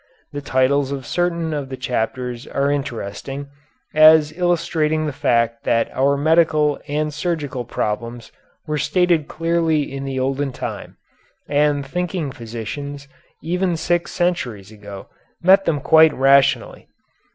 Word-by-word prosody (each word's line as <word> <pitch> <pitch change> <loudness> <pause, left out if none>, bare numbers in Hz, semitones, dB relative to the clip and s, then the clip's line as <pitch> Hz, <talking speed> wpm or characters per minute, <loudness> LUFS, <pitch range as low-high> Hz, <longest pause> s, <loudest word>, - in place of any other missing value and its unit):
The 145 - -4
titles 135 +1 +1
of 135 -2 -5
certain 170 -2 -1
of 145 -3 -4
the 130 - -6
chapters 125 0 -3
are 140 +1 0
interesting, 135 0 -5 0.4
as 155 0 +6
illustrating 160 -3 0
the 150 - -3
fact 115 -2 0
that 115 0 0
our 140 +2 +2
medical 155 -1 +2
and 150 +1 -2
surgical 145 -6 -3
problems 115 +1 -4 0.3
were 150 -2 -2
stated 160 +1 +1
clearly 165 -2 0
in 135 0 -5
the 135 -1 -3
olden 135 +1 -1
time, - - -7 0.5
and 145 -1 +1
thinking 175 -1 -3
physicians, 140 +4 -7 0.4
even 180 +1 -1
six 175 +1 -1
centuries 120 - -2
ago, 100 -2 -10 0.4
met 195 +2 +5
them 150 -3 +1
quite 160 +3 +5
rationally. 135 +1 +2
145 Hz, 130 wpm, -20 LUFS, 130-160 Hz, 0.5 s, as